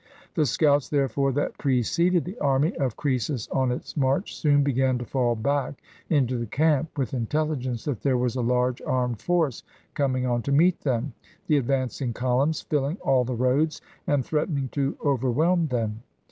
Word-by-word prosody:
The 150 - +2
scouts, 145 +2 +2
therefore, 140 -1 +1
that 145 +2 -2
preceded 160 +7 +1
the 185 +7 -7
army 140 +6 +1
of 135 -7 -1
Croesus 130 -3 -1
on 130 -2 +1
its 125 - -5
march, 140 +6 0
soon 145 -2 +3
began 130 -2 +1
to 120 - -5
fall 120 -1 0
back 140 +5 -1 0.3
into 130 -5 +1
the 115 - -3
camp, 155 +5 +1
with 130 -4 -2
intelligence 130 -1 -2
that 140 -7 -3
there 135 -3 +2
was 125 -1 0
a 125 - -1
large 125 +1 +1
armed 125 -3 -1
force 165 -8 0 0.3
coming 130 -3 0
on 120 -1 0
to 140 - -3
meet 165 +5 +4
them, 130 -1 -1 0.3
the 150 - +3
advancing 130 -1 -1
columns 130 +6 0
filling 145 +3 -1
all 130 -2 +3
the 125 0 -3
roads, 130 +6 +1 0.3
and 140 -4 +1
threatening 150 -3 -1
to 140 +1 -2
overwhelm 150 +6 +2
them. 115 -4 -2
135 Hz, 170 wpm, -25 LUFS, 125-150 Hz, 0.3 s, meet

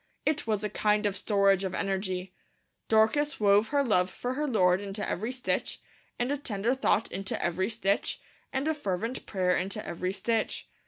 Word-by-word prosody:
It 300 -5 0
was 215 -2 0
a - - +1
kind 210 0 +2
of 200 -2 +1
storage 200 -2 +3
of 190 -1 -2
energy. 190 -2 -2 0.5
Dorcas 225 +8 +3
wove 205 +1 +4
her 280 +3 +2
love 185 -7 +2
for 245 +6 -4
her 295 +3 -1
Lord 185 -6 +3
into 205 +1 -4
every 220 +6 -2
stitch, 255 -1 -2 0.4
and 245 +3 0
a 290 - 0
tender 225 -2 -1
thought 265 -4 +1
into 195 0 -3
every 180 +4 0
stitch, 205 -3 0 0.3
and 270 +2 -1
a 315 - +2
fervent 230 - -3
prayer 180 -2 +1
into 195 +3 -3
every 180 +2 -2
stitch. 225 +2 -1
210 Hz, 175 wpm, -29 LUFS, 190-240 Hz, 0.5 s, wove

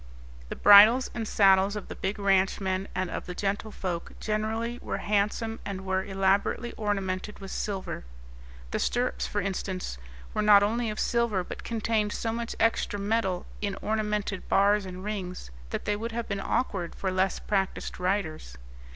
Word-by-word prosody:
The - - -4
bridles 215 +5 +8
and 225 -2 -3
saddles 195 0 +4
of 210 - -5
the - - -6
big 195 +3 -2
ranchmen 195 -1 +1
and 185 -1 -1
of - - -5
the 180 - -5
gentlefolk 195 -3 -3
generally 225 +3 -2
were - - -3
handsome 210 +2 0
and 190 -1 -5
were 190 0 0
elaborately 195 +4 +1
ornamented 200 -1 -2
with 195 -1 -8
silver. 195 - -3 0.7
The - - -1
stirrups, 250 +1 0
for 205 - -1
instance, 185 - -3 0.3
were - - 0
not 205 -1 +7
only 230 +2 0
of 210 - -4
silver, 235 -6 +1
but - - -8
contained 220 -2 0
so 225 -1 -2
much 235 0 -4
extra 225 -2 +1
metal 200 -3 0 0.2
in 200 -1 -2
ornamented 210 -2 -2
bars 200 0 +3
and 185 0 -7
rings 190 - -5 0.2
that - - -4
they 210 - +1
would 225 +2 -4
have 235 0 -3
been 200 -1 -2
awkward 190 -9 -1
for 190 - -2
less 185 +1 +1
practised 195 -3 -2
riders. 175 - -2
205 Hz, 160 wpm, -28 LUFS, 190-215 Hz, 0.7 s, bridles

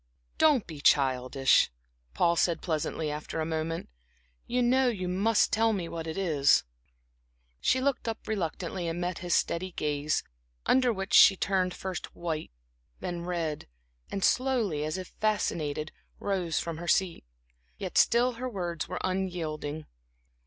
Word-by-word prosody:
"Don't 295 -8 +4
be 155 -4 -9
childish," 135 -1 +3 0.5
Paul 170 0 +3
said, 170 -1 +1
pleasantly, 155 -1 -2
after 150 +2 -5
a 160 - 0
moment. 160 +1 -3 0.6
"You 250 +1 +1
know 255 +2 +3
you 195 -7 -1
must 200 +5 +2
tell 225 +1 +3
me 180 -5 -2
what 165 -1 -5
it 160 - -4
is." 155 -7 +3 1.0
She 260 - +2
looked 265 -2 0
up 225 -1 -4
reluctantly, 180 -3 -3
and 165 +1 -3
met 180 0 -2
his 175 -1 0
steady 185 +2 -1
gaze, 150 -1 -1 0.4
under 255 -1 +4
which 195 -2 -4
she 195 - +8
turned 185 -2 0
first 190 -2 -6
white, 160 -3 -3 0.5
then 175 -2 -4
red, 165 -4 -3 0.4
and 195 - -3
slowly, 235 - +1
as 155 +3 -2
if 185 -1 -7
fascinated, 155 -8 -1 0.3
rose 185 -5 -1
from 165 -2 -4
her 175 - -6
seat. 180 -1 +1 0.5
Yet - - -6
still 240 +2 +4
her 250 +2 -5
words 175 -6 -3
were 180 - -4
unyielding. 160 -5 -3
175 Hz, 145 wpm, -29 LUFS, 160-200 Hz, 1.0 s, she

